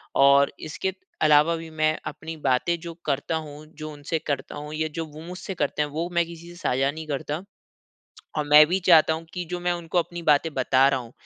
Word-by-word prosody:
और 140 0 +5
इसके 180 +4 -3 0.3
अलावा 150 +2 +5
भी 165 0 -8
मैं 155 0 +1
अपनी 160 +2 -6
बातें 130 +7 +2
जो 170 -1 -7
करता 145 +2 -1
हूँ 155 -1 -6
जो 155 0 -6
उनसे 145 +3 -3
करता 140 0 -3
हूँ 150 +1 -7
या 155 0 0
जो 165 -1 -2
वो 155 0 -12
मुझसे 180 +2 -6
करते 150 - -1
हैं 150 - -4
वो 160 +4 -3
मैं 170 -1 +3
किसी 170 0 -11
से 175 - -12
साझा 135 -4 0
नहीं 160 +1 -8
करता। 150 +4 -3 0.9
और 150 - -1
मैं 150 +1 +8
भी 185 +4 0
चाहता 160 -2 +7
हूँ 160 +1 -6
कि 180 -1 -3
जो 180 0 -3
मैं 175 0 0
उनको 170 0 -2
अपनी 175 0 -2
बातें 150 +1 +3
बता 130 +1 +4
रहा 135 -1 0
हूँ 120 -1 -11
155 Hz, 220 wpm, -25 LUFS, 145-170 Hz, 0.9 s, मैं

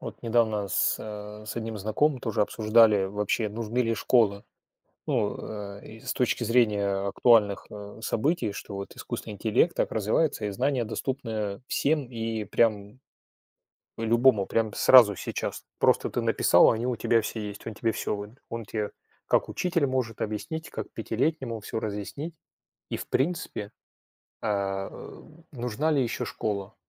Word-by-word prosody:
Вот - - -8
недавно 110 -4 +1
с, - - +2
э, 105 0 -8
с 110 - -6
одним 115 -1 -3
знакомым 125 +7 +1
тоже 115 -2 -1
обсуждали, 110 -2 +4
вообще, 105 +2 -1
нужны 115 +2 -4
ли 115 -2 +2
школы. 105 -3 +2 0.6
Ну, 120 -9 0
э, 100 -1 -7
и 110 +1 -11
с - - -3
точки 125 -1 0
зрения 105 -4 +2
актуальных, 105 -1 +4
э, 105 +1 -9
событий, 145 +1 0
что 100 0 -7
вот 100 0 -7
искусственный 105 - -6
интеллект 110 - +2
так - - 0
развивается, 110 +3 +1
и 105 - -1
знания 125 +5 0
доступны 110 -3 -3
всем 150 -1 +1
и 115 -2 -3
прям 105 +2 +1 1.0
любому, 115 -1 +4
прям 110 -2 0
сразу 115 -6 +7
сейчас. - - -4
Просто - - +3
ты - - -1
написал, - - +5
а - - +2
они 115 +3 -2
у 125 - 0
тебя 115 +1 +2
все 110 - -4
есть. 105 -1 -7
Он 115 - -5
тебе 115 +1 0
всё 105 - -2
выд 105 +1 -7 0.2
он 115 -1 -4
те, 105 0 -3 0.4
как - - +2
учитель, 170 -5 0
может 130 -4 -2
объяснить, 160 +10 -4
как - - -6
пятилетнему 120 +1 -1
всё 110 +2 -4
разъяснить. 110 - -5 0.6
И, - - -1
в - - -7
принципе, 135 - -1 0.7
э, - - -2 0.4
ы, - - -11 0.3
нужна 125 +4 -1
ли 140 -3 +3
ещё 120 - -2
школа? 100 -1 -3
110 Hz, 155 wpm, -27 LUFS, 105-125 Hz, 1.0 s, сразу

